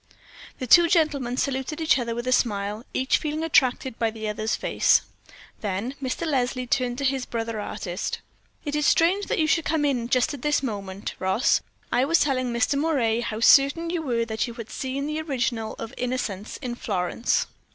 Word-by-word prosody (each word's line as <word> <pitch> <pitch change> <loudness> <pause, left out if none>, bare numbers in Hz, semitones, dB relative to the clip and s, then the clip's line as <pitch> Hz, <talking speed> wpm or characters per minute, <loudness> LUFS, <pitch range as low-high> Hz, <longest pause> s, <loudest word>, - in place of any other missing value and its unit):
The 255 - -4
two 340 +8 +7
gentlemen 295 -8 +1
saluted 270 +3 -2
each 320 -4 +3
other 235 -1 -2
with 240 +1 -4
a 255 - 0
smile, 210 -3 0
each 260 +2 +1
feeling 305 +1 -3
attracted 260 -5 +2
by 230 - +2
the 220 -1 -6
other's 215 +1 -1
face. - - +3 0.6
Then 205 +5 -3
Mr. 265 +5 -2
Leslie 255 -4 0
turned 245 -1 0
to 280 - -3
his 265 -1 0
brother 230 -1 -3
artist. 180 -3 -4 0.5
"It 290 0 -2
is 300 -1 +2
strange 370 +5 +3
that - - 0
you 315 - +3
should 320 +1 +2
come 305 -1 0
in 245 -4 0
just 255 +5 +2
at 280 - -7
this 295 0 +1
minute, 200 -5 -4
Ross, 190 +6 +2 0.3
I 250 - +3
was 330 +3 +3
telling 255 -3 +1
Mr. 245 +4 +1
Moray 260 -8 +1
how 230 -2 -4
certain 285 +7 +5
you 345 -2 -1
were 235 -6 0
that 220 +1 -2
you 235 - -8
had 230 -1 -8
seen 270 +1 -3
the 305 +1 -2
original 245 -7 -2
of 230 +2 -7
'Innocence' 240 -5 -3
in 245 -2 -3
Florence." 200 -1 -1
255 Hz, 190 wpm, -25 LUFS, 230-290 Hz, 0.6 s, two